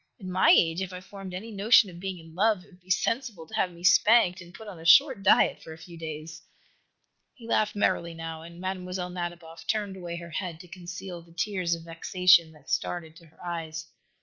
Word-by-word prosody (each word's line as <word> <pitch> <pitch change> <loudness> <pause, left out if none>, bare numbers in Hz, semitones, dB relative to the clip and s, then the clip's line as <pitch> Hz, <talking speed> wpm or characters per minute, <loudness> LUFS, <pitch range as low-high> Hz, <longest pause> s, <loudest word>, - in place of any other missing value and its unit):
At 195 - -10
my 185 0 +3
age, 165 +2 +5
if 190 -1 -4
I 180 - -6
formed 195 0 -10
any 200 +6 -7
notion 210 +2 +5
of 170 - -11
being 190 0 -4
in 165 -1 -14
love, 205 +1 +2
it 200 - -22
would 180 - -20
be 180 - -24
sensible 225 -2 -1
to 220 - -18
have 190 -4 +1
me 170 0 -14
spanked 185 +1 +5
and 175 0 -13
put 220 +5 -12
on 190 -5 -9
a - - -11
short 265 - +6
diet 195 - +4
for 160 - -9
a - - -12
few 170 +1 -12
days." 160 0 -7 0.9
He 235 -4 -13
laughed 215 -2 +1
merrily, 170 -4 0
now, 165 -1 -6
and 170 +1 -12
Mlle. 180 -1 -4
Nadiboff 175 -2 -7
turned 205 -3 -1
away 175 -2 -6
her 170 0 -9
head 170 -1 -4
to 180 - -14
conceal 180 0 -8
the 170 0 -19
tears 185 -3 0
of 165 - -11
vexation 170 +1 +3
that 150 -2 -13
started 160 -3 -2
to 170 - -17
her 160 - -16
eyes. 160 -2 -5
180 Hz, 220 wpm, -27 LUFS, 165-190 Hz, 0.9 s, short